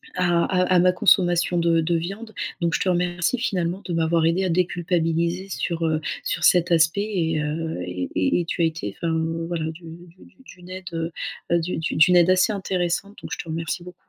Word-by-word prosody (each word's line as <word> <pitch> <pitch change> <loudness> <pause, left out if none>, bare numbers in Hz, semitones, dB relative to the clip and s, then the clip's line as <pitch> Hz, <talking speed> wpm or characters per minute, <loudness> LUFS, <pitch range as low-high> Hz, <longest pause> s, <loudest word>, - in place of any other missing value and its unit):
à 175 -2 +2
à 185 -1 +1
à - - +6
ma 180 +1 +5
consommation 175 -1 +3
de 170 -1 +3
de 170 +2 0
viande. 195 +7 -5 0.3
Donc 170 -1 +1
je - - 0
te - - -1
remercie 180 +5 0
finalement 185 -5 -1
de 180 - -5
m'avoir 165 0 +2
aidée 175 +4 +2
à 185 - 0
déculpabiliser 170 +1 0
sur, 170 -2 -2
heu, 155 -1 +1 0.2
sur - - -2
cet 175 -1 +4
aspect 165 +3 +3
et 165 -7 -1
heu, 160 - -3
et 90 0 -4
et 95 - +2
et - - -5
tu 170 - -3
as - - +4
été, 160 -12 -3
enfin, 165 -1 -1 0.3
voilà, 170 -2 -2
d'u 165 +2 -14 0.2
d'u 175 +2 -18
d'u - - -21
d'une 180 -5 -14
aide, 185 0 -8
heu 165 0 -3 0.4
heu, 170 - +4
d'u 170 +2 -3
d'u 160 +1 -2
d'une 170 +3 +5
aide 175 0 +5
assez 185 +3 +4
intéressante 190 0 -2
donc - - -9
je - - -4
te - - -7
remercie 165 +2 -3
beaucoup. 180 0 -11
170 Hz, 215 wpm, -23 LUFS, 165-180 Hz, 0.4 s, à